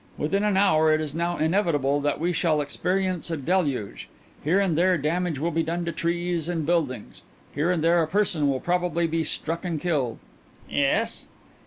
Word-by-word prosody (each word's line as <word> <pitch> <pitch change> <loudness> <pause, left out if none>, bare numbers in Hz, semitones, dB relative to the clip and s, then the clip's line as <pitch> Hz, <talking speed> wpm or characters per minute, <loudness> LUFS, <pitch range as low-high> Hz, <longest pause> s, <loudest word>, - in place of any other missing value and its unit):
Within 195 +7 0
an 210 -2 +2
hour 160 -6 +4
it 155 - +3
is 155 -2 -4
now 170 +2 -1
inevitable 155 -5 +1
that 145 0 -1
we 175 +3 0
shall 160 -2 +1
experience 180 +4 -1
a 165 - -2
deluge. 145 - -1 0.3
Here 170 +7 +3
and 190 -5 +1
there 180 +2 +3
damage 165 +2 -1
will 165 +5 -1
be 165 - +1
done 170 +2 -2
to 170 - -2
trees 170 0 -2
and 165 -3 -2
buildings; 150 -9 -1 0.3
here 150 +5 0
and 175 -3 +1
there 170 +1 +4
a 160 - 0
person 170 -5 +1
will 135 -1 0
probably 175 -1 0
be 165 0 0
struck 165 +2 -3
and 170 -4 -2
killed." 145 -9 -1 0.5
"Yes." - - 0
165 Hz, 185 wpm, -25 LUFS, 150-175 Hz, 0.5 s, hour